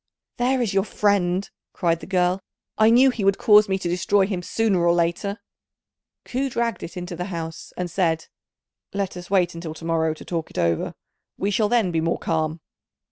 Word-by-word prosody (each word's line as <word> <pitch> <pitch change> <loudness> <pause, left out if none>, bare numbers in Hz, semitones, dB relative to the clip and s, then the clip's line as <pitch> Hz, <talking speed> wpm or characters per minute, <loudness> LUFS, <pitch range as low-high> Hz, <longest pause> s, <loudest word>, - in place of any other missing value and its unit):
"There 250 +1 +2
is 210 -4 -2
your 195 0 +3
friend," 195 -3 +1 0.3
cried 165 -2 +1
the - - -10
girl; 180 0 +1 0.3
"I 220 0 +5
knew 255 +3 +6
he 230 -4 -4
would 195 0 +3
cause 210 -1 +6
me 190 - +1
to 185 - -4
destroy 190 +3 +2
him 190 -3 -3
sooner 205 +1 +1
or 170 0 +4
later." 175 +5 -1 0.9
Ku 270 +2 -1
dragged 235 -5 -1
it 180 - -7
into 180 0 -5
the 180 +1 -4
house, 165 -4 -6
and 180 - -2
said, 165 -2 0 0.7
"Let 200 -2 -2
us 175 -1 -9
wait 185 -3 +3
till 165 -2 -7
to 165 - -10
morrow 160 -1 +1
to - - -12
talk 165 -2 -3
it - - -12
over; 85 -2 0 0.4
we 200 - -1
shall 210 +1 +2
then 230 -7 +2
be 165 -1 0
more 165 +1 0
calm." 160 0 -1
180 Hz, 195 wpm, -23 LUFS, 170-205 Hz, 0.9 s, knew